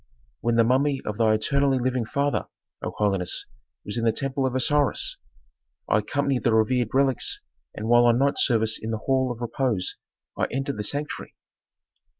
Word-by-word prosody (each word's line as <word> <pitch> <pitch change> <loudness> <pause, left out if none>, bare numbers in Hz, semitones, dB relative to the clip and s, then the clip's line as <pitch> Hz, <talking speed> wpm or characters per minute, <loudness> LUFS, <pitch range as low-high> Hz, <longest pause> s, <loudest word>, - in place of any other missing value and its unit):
"When 120 0 0
the 115 - +5
mummy 135 +4 +2
of 105 +1 -4
thy 110 -1 +4
eternally 140 +5 +1
living 125 -1 -1
father, 140 +4 -1 0.3
O - - -3
holiness, 95 -4 0 0.4
was 105 +3 -2
in - - -2
the 115 - +4
temple 135 +3 -1
of 130 - -4
Osiris. 145 +2 +1 0.7
I 105 - +3
accompanied 140 +4 -1
the 115 -2 +3
revered 120 +1 +2
relics 135 -1 +1 0.4
and 110 - -5
while 120 +1 +5
on 120 -1 +4
night 140 +2 +1
service 110 -3 +3
in 110 - -5
the 110 - -1
hall 130 -1 +1
of 120 - -7
'repose' 120 -5 -1 0.4
I - - 0
entered 135 0 -3
the 105 - -3
sanctuary." 145 +7 -3
125 Hz, 170 wpm, -25 LUFS, 110-135 Hz, 0.7 s, the